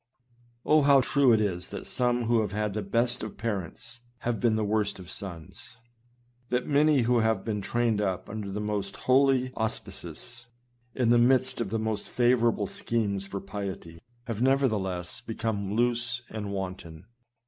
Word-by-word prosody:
Oh! 155 0 +5
how 140 -1 +6
true 135 0 +4
it 110 - +5
is 90 -4 -1
that - - -7
some 120 -1 +1
who 115 0 +3
have 105 -3 -3
had 105 -1 -1
the 105 - -2
best 120 +5 0
of 110 -2 -6
parents, 115 +2 -4 0.2
have 120 -3 -1
been 115 -3 +2
the 110 -1 0
worst 105 -1 0
of 90 -2 -10
sons; 95 +5 -8 0.7
that 125 0 0
many 145 -1 +4
who 120 +1 +3
have 110 -3 +1
been 105 -2 -2
trained 115 +1 +1
up 95 -3 -2
under 105 -1 -5
the 105 - -3
most 105 -2 -3
holy 130 -1 +3
auspices, 110 +1 -3 0.5
in 120 -3 +2
the 120 - +6
midst 130 0 +3
of 110 - -2
the 115 - -1
most 110 -1 -2
favorable 120 -3 +2
scenes 100 -2 -2
for 100 0 -4
piety, 95 -4 -6 0.2
have 115 -2 -4
nevertheless, 110 -10 0
become 105 -3 -3
loose 120 0 0
and 105 -2 -4
wanton 95 -4 -6
110 Hz, 165 wpm, -28 LUFS, 100-120 Hz, 0.7 s, how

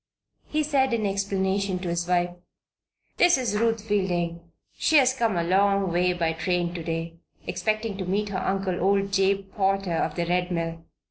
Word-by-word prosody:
He 305 0 0
said, 265 -4 +2
in 220 -2 -1
explanation, 195 -1 0
to 180 -1 -4
his 170 0 -2
wife: 175 0 +1 0.9
"This 350 -4 +5
is 245 -5 -1
Ruth 225 0 +1
Fielding. 175 -5 -1 0.3
She 315 - +3
has 260 -2 +5
come 230 -7 0
a 170 - +1
long 195 +1 +2
way 180 +1 +2
by 165 -2 0
train 175 +1 -1
to 175 - -5
day, 165 0 -4 0.3
expecting 215 +4 -2
to 190 - -4
meet 205 +3 -1
her 190 -2 -2
uncle, 190 -2 -1
old 195 +1 +1
Jabe 195 0 +2
Potter 195 -2 +1
of 165 - -1
the 170 - -1
Red 180 +1 0
Mill. 165 -1 -3
190 Hz, 180 wpm, -25 LUFS, 175-205 Hz, 0.9 s, This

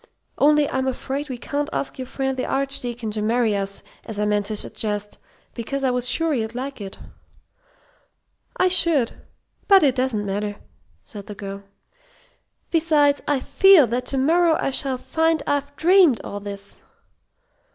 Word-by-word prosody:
Only 295 0 +4
I'm 260 -1 -2
afraid 270 +3 -3
we 255 - -4
can't 290 +4 -3
ask 275 - -4
your 255 - -5
friend 265 0 -2
the 255 - -3
Archdeacon 245 -4 -1
to 210 0 -3
marry 225 0 +1
us, 195 0 -4 0.2
as 220 -3 -8
I 210 - 0
meant 205 -1 0
to 215 - -3
suggest, 210 0 -4 0.3
because 275 +4 -4
I 260 - +2
was 250 0 0
sure 325 +3 +1
you'd 225 -3 -2
like 265 -1 -5
it." 195 -1 -7 1.6
"I 370 - +3
should. 330 -9 +3 0.6
But 390 -4 +6
it 275 -3 +4
doesn't 250 -5 -1
matter," 205 +1 -3 0.5
said 205 -2 -10
the 210 - -7
girl. 195 0 -7 1.1
"Besides, 305 -4 +3
I 285 -3 +1
feel 385 -3 +6
that 245 +2 -3
to 270 - -2
morrow 325 +4 +3
I - - -1
shall 265 0 0
find 320 +4 0
I've 285 0 -2
dreamed 345 - +5
all 205 - -6
this." 200 0 -7
260 Hz, 160 wpm, -22 LUFS, 215-290 Hz, 1.6 s, But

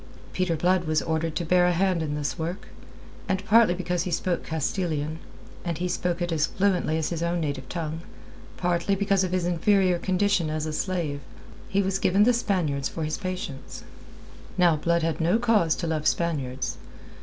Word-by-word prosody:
Peter 185 -2 0
Blood 180 +2 +2
was 155 0 +1
ordered 160 0 -1
to 175 - -1
bear 180 +1 +4
a - - +3
hand 185 -1 +1
in 150 -2 -2
this 150 +1 -3
work, 170 +4 -4 0.6
and 190 0 -1
partly 220 -4 +5
because 180 -1 -1
he 180 - -2
spoke 175 +1 -1
Castilian 160 -1 -2 0.4
and 170 -3 -2
he 180 - -1
spoke 175 -1 -1
it 175 - -2
as 160 -1 +2
fluently 185 -5 +1
as 160 - -1
his 170 -2 -3
own 170 +1 0
native 140 -4 -3
tongue 165 -1 -4 0.6
partly 175 +2 +1
because 195 -1 +2
of 185 - -2
his 180 -1 0
inferior 180 +1 +2
condition 185 -2 +1
as 155 0 -2
a 155 - -3
slave, 165 -5 -2 0.5
he 200 +1 +2
was 190 0 0
given 195 +3 +4
the 245 +3 +5
Spaniards 175 - 0
for 165 - -4
his 155 0 -2
patients. 180 -8 -6 0.7
Now 175 -3 +5
Blood 170 +2 +1
had 165 0 -1
no 175 +7 +3
cause 220 -9 +3
to 175 - -4
love 155 -1 -1
Spaniards. 135 -7 -1
175 Hz, 185 wpm, -26 LUFS, 160-185 Hz, 0.7 s, partly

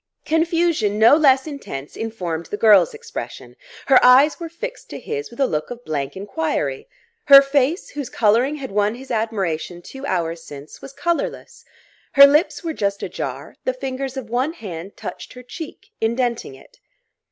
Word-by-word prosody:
Confusion 325 - +1
no 225 +5 +7
less 270 -4 +4
intense 210 - -7
informed 180 -8 -4
the 205 - -4
girl's 220 - +5
expression; 450 - -8 0.3
her 265 -2 +5
eyes 265 +6 +6
were 335 -1 -6
fixed 485 +10 -8
to - - -7
his 445 -1 -5
with 235 - -15
a 275 - +4
look 155 -9 -2
of 245 0 -9
blank 145 0 -3
enquiry; 320 - -3 0.4
her 275 -1 +10
face, 275 +4 0
whose 285 -3 -6
colouring 235 +7 +2
had 275 -5 -7
won 210 +2 +1
his 265 +2 -10
admiration 195 -7 -2
two 270 0 -10
hours 165 -4 -2
since, 145 -1 -11
was 270 - -10
colourless; 345 - -3 0.5
her 280 0 +10
lips 300 +7 +2
were 330 -1 -3
just 200 -6 -2
ajar; - - -5
the - - 0
fingers 270 - -5
of 260 -4 -5
one 255 +7 -1
hand 190 - -8
touched - - -8
her 250 0 -11
cheek, 325 - -10
indenting 235 - -1
it. 135 - -19
255 Hz, 165 wpm, -21 LUFS, 205-305 Hz, 0.5 s, her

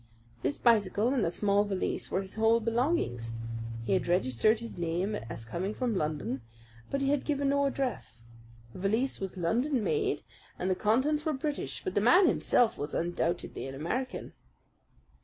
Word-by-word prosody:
This 140 - 0
bicycle 215 -1 +3
and 260 -4 +1
a 165 - +2
small 200 +3 +2
valise 195 -3 -2
were 190 - 0
his 190 - -10
whole 225 +1 +4
belongings. 225 - 0 0.5
He - - +1
had 185 - +1
registered 175 - +2
his 230 0 -7
name 175 +4 -1
as 115 - -5
coming 185 - -3
from 245 -4 -1
London, 150 -6 -2 0.5
but 275 0 -1
had 275 0 +2
given 285 -2 0
no 280 0 +3
address. 250 - -3 0.5
The - - -9
valise 220 +8 +1
was 190 -1 -5
London 235 - +1
made, 415 - 0 0.3
and 185 +1 -1
the - - +2
contents 260 +10 +2
were 315 - 0
British; 290 +1 -3
but 375 - -3
the - - +2
man 350 - +6
himself 245 -7 +3
was 145 +1 -3
undoubtedly 170 -3 -2
an 135 - -7
American." 250 - -3
215 Hz, 165 wpm, -30 LUFS, 175-265 Hz, 0.5 s, man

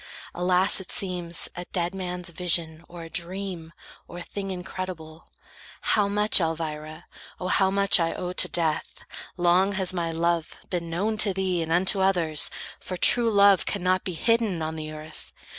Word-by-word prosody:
Alas, 180 +2 +2
it 185 - -10
seems 175 -3 -1
A 175 - -6
dead 175 -1 -3
man's 180 -2 -5
vision, 165 -1 0
or 170 -1 -10
a 165 - -10
dream, 175 -2 -3 0.4
or 175 - -9
thing 195 +3 -6
Incredible! 180 -3 -7 0.6
How 210 -2 +2
much, 210 0 +5
Elvira, 155 -1 -4 0.3
O, 185 - -3
How 190 0 +3
much 200 0 +3
I 165 -1 +1
owe 180 0 -4
to - - +2
death! 160 -3 -2 0.3
Long 180 +3 +3
has 190 -2 -1
my 170 -2 -2
love 165 0 -1
Been 170 -2 -3
known 205 +6 -1
to 210 -3 +4
thee, 185 -2 -1
and 165 0 -4
unto 190 +3 +3
others, 170 -6 +2 0.3
for 185 - -5
True 235 +5 +6
love 200 -2 +4
cannot 185 -1 0
be 185 - -4
hidden 220 -3 0
on 160 0 -4
the 155 -1 -6
earth. 155 0 -10
180 Hz, 165 wpm, -25 LUFS, 165-190 Hz, 0.6 s, True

